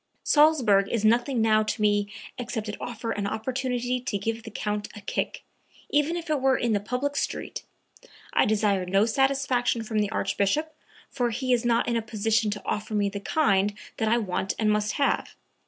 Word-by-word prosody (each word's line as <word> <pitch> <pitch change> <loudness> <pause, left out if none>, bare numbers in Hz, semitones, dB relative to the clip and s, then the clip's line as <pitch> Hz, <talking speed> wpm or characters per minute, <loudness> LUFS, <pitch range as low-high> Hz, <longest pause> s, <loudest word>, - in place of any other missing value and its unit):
"Salzburg 255 -11 +4
is 220 -2 0
nothing 240 +2 +3
now 215 -1 +4
to 215 - -2
me 205 -1 +2 0.3
except 235 -3 -4
it 210 - -4
offer 230 -1 -4
an 205 -1 -2
opportunity 250 +2 -2
to 240 -4 -2
give 225 +3 -3
the 225 - -9
Count 210 -1 -3
a 205 - -9
kick...even 295 +9 -3
if 340 0 -6
it 305 -3 0
were 265 0 +3
in 235 -2 0
the 205 - +2
public 250 +7 -2
street. - - -3 0.7
I - - +4
desire 205 -3 +2
no 195 +3 +3
satisfaction 255 -1 +1
from 220 -1 -1
the 205 -1 +1
Archbishop, 215 +12 0 0.4
for 245 -3 0
he 255 +3 0
is 240 0 +1
not 235 -1 +2
in 235 - 0
a - - 0
position 220 0 0
to 205 0 -5
offer 215 +1 -2
me 205 -1 +2
the 200 0 -5
kind 205 -5 +2 0.2
that 220 - 0
I 230 +2 +3
want 195 -3 -2
and 215 -1 +2
must 210 0 0
have. 280 - 0
225 Hz, 190 wpm, -26 LUFS, 210-250 Hz, 0.7 s, Salzburg